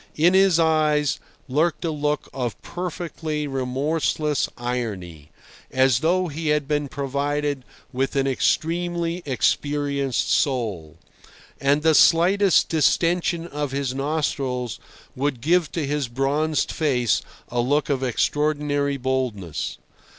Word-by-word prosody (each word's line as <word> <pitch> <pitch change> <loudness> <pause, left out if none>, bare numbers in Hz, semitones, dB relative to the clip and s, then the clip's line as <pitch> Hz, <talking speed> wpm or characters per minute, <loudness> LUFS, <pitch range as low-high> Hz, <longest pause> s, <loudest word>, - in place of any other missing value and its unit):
In 170 +4 +4
his 190 -3 +5
eyes 155 -2 +2 0.3
lurked 155 +6 0
a 165 - 0
look 150 -1 -1
of 125 -4 -3
perfectly 165 -3 -4
remorseless 145 +3 -1
irony, 100 -11 -4 0.4
as 130 -2 +3
though 180 +4 +1
he 160 +1 -5
had 150 -2 +1
been 145 -1 0
provided 140 0 -2 0.3
with 135 +3 -1
an 135 -1 +2
extremely 170 +5 0
experienced 140 0 0
soul; 105 - 0 0.6
and 140 +2 +2
the 160 0 +5
slightest 185 +5 +5
distension 170 +2 +1
of 145 -4 -4
his 135 -2 -1
nostrils 135 -4 -2 0.4
would 135 -1 -1
give 165 +4 +2
to 165 -4 -1
his 145 -1 -1
bronzed 140 +5 0
face 125 -8 +1 0.3
a 120 - -2
look 145 +5 +1
of 140 -3 0
extraordinary 145 +3 0
boldness. 125 - -2
145 Hz, 115 wpm, -23 LUFS, 130-160 Hz, 0.6 s, his